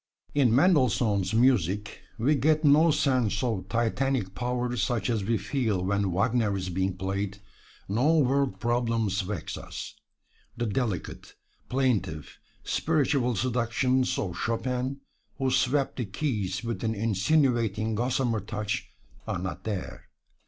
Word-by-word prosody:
In 130 Hz, -6 st, +3 dB
Mendelssohn's 120 Hz, -, +3 dB
music 105 Hz, -5 st, +2 dB, 0.2 s
we 125 Hz, +7 st, +2 dB
get 155 Hz, +2 st, +2 dB
no 150 Hz, +3 st, +6 dB
sense 130 Hz, -8 st, +1 dB
of 100 Hz, -7 st, -2 dB
Titanic 115 Hz, -1 st, 0 dB
power 125 Hz, +3 st, -2 dB
such 120 Hz, 0 st, 0 dB
as 110 Hz, -3 st, 0 dB
we 115 Hz, +3 st, +1 dB
feel 105 Hz, -1 st, -1 dB
when 100 Hz, 0 st, 0 dB
"Wagner" 105 Hz, +2 st, +1 dB
is 90 Hz, -1 st, -4 dB
being 95 Hz, +1 st, -1 dB
played; 100 Hz, +1 st, -3 dB, 0.5 s
no 130 Hz, +11 st, +2 dB
world 135 Hz, -7 st, +1 dB
problems 115 Hz, -3 st, 0 dB
vex 95 Hz, -1 st, -5 dB
us. -, -, -7 dB, 0.6 s
The 120 Hz, -, -1 dB
delicate, 105 Hz, -4 st, -3 dB, 0.3 s
plaintive, 120 Hz, -, -1 dB, 0.2 s
spiritual 140 Hz, -6 st, +1 dB
seductions 125 Hz, +3 st, +1 dB
of 90 Hz, -3 st, -3 dB
Chopin, 125 Hz, +3 st, -2 dB, 0.4 s
who 135 Hz, -1 st, 0 dB
swept 135 Hz, +2 st, +1 dB
the 125 Hz, -, -1 dB
keys 100 Hz, -4 st, -2 dB
with 115 Hz, 0 st, -4 dB
an 110 Hz, 0 st, 0 dB
insinuating 110 Hz, 0 st, +1 dB
gossamer 120 Hz, 0 st, 0 dB
touch, 105 Hz, +1 st, -4 dB, 0.4 s
are -, -, -1 dB
not 90 Hz, -2 st, -5 dB
there. 100 Hz, -4 st, -5 dB
115 Hz, 125 wpm, -27 LUFS, 100-130 Hz, 0.6 s, no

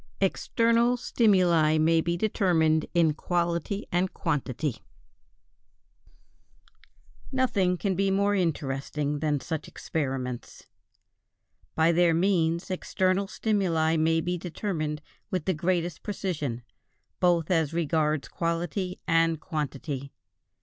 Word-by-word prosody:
=External 230 Hz, +5 st, +2 dB
stimuli 180 Hz, -10 st, +3 dB
may 160 Hz, +1 st, +3 dB
be 170 Hz, +1 st, -1 dB
determined 170 Hz, -6 st, +2 dB
in 165 Hz, -3 st, +4 dB
quality 170 Hz, +4 st, -1 dB
and 180 Hz, +2 st, +1 dB
quantity=. 145 Hz, -4 st, -2 dB, 2.5 s
Nothing 200 Hz, -9 st, +1 dB
can 195 Hz, +1 st, 0 dB
be 195 Hz, +2 st, +1 dB
more 200 Hz, +1 st, +2 dB
interesting 145 Hz, -4 st, -1 dB
than 150 Hz, -1 st, 0 dB
such 160 Hz, +1 st, -4 dB
experiments. 130 Hz, -5 st, -4 dB, 1.1 s
By 160 Hz, +1 st, +4 dB
their 170 Hz, -1 st, +3 dB
means 170 Hz, -1 st, +1 dB
external 185 Hz, +1 st, 0 dB
stimuli 180 Hz, -7 st, +1 dB
may 160 Hz, +1 st, +2 dB
be 175 Hz, +1 st, -2 dB
determined 155 Hz, -4 st, -3 dB, 0.3 s
with 185 Hz, -6 st, -2 dB
the 190 Hz, -, +1 dB
greatest 175 Hz, 0 st, -1 dB
precision, 150 Hz, -, -3 dB, 0.6 s
both 175 Hz, -2 st, +2 dB
as 160 Hz, -4 st, +2 dB
regards 155 Hz, -4 st, 0 dB
quality 175 Hz, +4 st, -2 dB
and 165 Hz, -1 st, +3 dB
quantity. 145 Hz, -3 st, -4 dB
165 Hz, 100 wpm, -27 LUFS, 155-185 Hz, 2.5 s, in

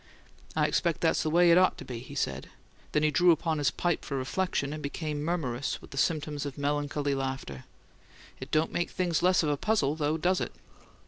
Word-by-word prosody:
"I -, -, +3 dB
expect 170 Hz, -3 st, 0 dB
that's 165 Hz, -1 st, +2 dB
the 155 Hz, -, 0 dB
way 170 Hz, +2 st, +5 dB
it 170 Hz, -, +7 dB
ought 185 Hz, -, +3 dB
to -, -, -9 dB
be," 120 Hz, -2 st, -6 dB
he 125 Hz, -, -10 dB
said, -, -, -2 dB, 0.4 s
then 150 Hz, 0 st, +2 dB
drew 180 Hz, +3 st, +4 dB
upon 160 Hz, -2 st, +2 dB
his 145 Hz, -, +3 dB
pipe 175 Hz, -2 st, -1 dB
for 140 Hz, -, -3 dB
reflection, 140 Hz, +1 st, -1 dB
and 155 Hz, -, -6 dB
became 150 Hz, +1 st, -3 dB
murmurous 145 Hz, -6 st, -2 dB
with -, -, -15 dB
the 140 Hz, -, -8 dB
symptoms 150 Hz, -3 st, 0 dB
of 145 Hz, -1 st, -6 dB
melancholy 145 Hz, 0 st, -1 dB
laughter. 130 Hz, -, -4 dB, 0.7 s
"It 130 Hz, -, -7 dB
don't 155 Hz, +2 st, +1 dB
make 175 Hz, -, 0 dB
things 175 Hz, -3 st, 0 dB
less 180 Hz, 0 st, +4 dB
of 150 Hz, -, +1 dB
a 145 Hz, -, +1 dB
puzzle, 175 Hz, -7 st, +1 dB
though, 155 Hz, 0 st, 0 dB
does 180 Hz, +4 st, +1 dB
it?" -, -, -3 dB
150 Hz, 205 wpm, -29 LUFS, 140-170 Hz, 0.7 s, it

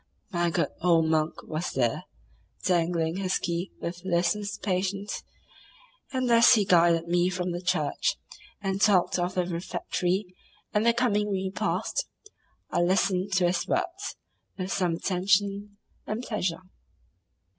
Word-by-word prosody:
My 175 Hz, -2 st, +1 dB
good 160 Hz, -, 0 dB
old 165 Hz, -2 st, +4 dB
monk 155 Hz, 0 st, 0 dB
was 155 Hz, +2 st, -4 dB
there, 120 Hz, -3 st, 0 dB, 0.6 s
dangling 170 Hz, -1 st, +1 dB
his 190 Hz, -1 st, 0 dB
key 175 Hz, +2 st, -3 dB
with 175 Hz, +1 st, -5 dB
listless 190 Hz, +3 st, 0 dB
patience, 195 Hz, +1 st, -2 dB, 0.9 s
and 255 Hz, -2 st, 0 dB
as 235 Hz, +1 st, +7 dB
he 210 Hz, -3 st, +2 dB
guided 170 Hz, -2 st, +4 dB
me 175 Hz, +1 st, +2 dB
from 180 Hz, -1 st, -2 dB
the 175 Hz, 0 st, -4 dB
church, 180 Hz, -5 st, 0 dB, 0.5 s
and 195 Hz, 0 st, -2 dB
talked 190 Hz, -4 st, +4 dB
of 175 Hz, +1 st, -1 dB
the 180 Hz, -1 st, +1 dB
refectory 180 Hz, +2 st, -2 dB, 0.5 s
and 215 Hz, +2 st, +2 dB
the 235 Hz, -, +6 dB
coming 210 Hz, -4 st, +1 dB
repast, 190 Hz, -, -1 dB, 0.6 s
I -, -, +1 dB
listened 185 Hz, +2 st, +1 dB
to 185 Hz, -2 st, +3 dB
his 175 Hz, +1 st, 0 dB
words 360 Hz, +2 st, -2 dB, 0.4 s
with 185 Hz, 0 st, -4 dB
some 180 Hz, -4 st, +1 dB
attention 200 Hz, +3 st, 0 dB, 0.3 s
and 220 Hz, +3 st, -3 dB
pleasure. 190 Hz, -7 st, -2 dB
185 Hz, 135 wpm, -27 LUFS, 175-200 Hz, 0.9 s, as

